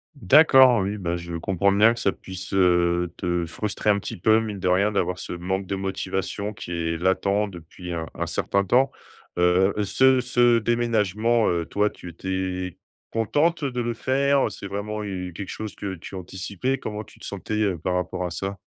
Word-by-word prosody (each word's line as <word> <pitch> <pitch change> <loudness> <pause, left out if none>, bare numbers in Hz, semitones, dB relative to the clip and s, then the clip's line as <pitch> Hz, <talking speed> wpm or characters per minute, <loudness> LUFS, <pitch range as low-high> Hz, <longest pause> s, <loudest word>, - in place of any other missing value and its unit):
D'accord, 130 -4 +6
oui, 100 +2 -2
bah, 85 -3 -2
je 85 -1 -6
comprends 95 +3 +1
bien 110 +4 +5
que 120 - -8
ça 100 - +2
puisse, 95 0 -9
heu, 85 -2 +2
te 85 -1 -1
frustrer 105 +4 -1
un 100 - +1
petit - - -6
peu, 110 +5 +4
mine 105 -3 -4
de 90 - -1
rien, 100 +4 +3
d'avoir 90 -2 -1
ce - - -6
manque 95 +2 -3
de 100 - -2
motivation, 95 +2 -3
qui 90 - -8
est 85 -1 -1
latent 100 +3 +1
depuis 85 +1 -9
un 80 -2 -4
un - - -2
certain 100 0 0
temps. 130 +6 +3 0.5
Heu, 90 +3 +3
ce 130 +5 +4
ce 120 -1 +3
déménagement, 115 -1 +1
heu, 85 -1 0
toi 105 +1 +1
tu 90 - -10
étais, 95 0 -4 0.3
contente 150 +9 +1
de 125 -3 -2
le 120 0 -1
faire? 140 +3 +2
Heu, - - -4
c'est - - -9
vraiment 105 +2 -4
u 90 -3 -5
quelque 100 +1 -6
chose 110 -1 -6
que 100 -2 -5
tu 90 +3 -10
anticipais? 95 +8 -3
Comment 105 0 -5
tu - - -19
te - - -10
sentais, - - -5
heu, 100 -5 +1
par 90 +3 -2
rapport 90 0 -2
à 90 - -4
ça? 95 +2 -4
100 Hz, 195 wpm, -24 LUFS, 90-110 Hz, 0.5 s, D'accord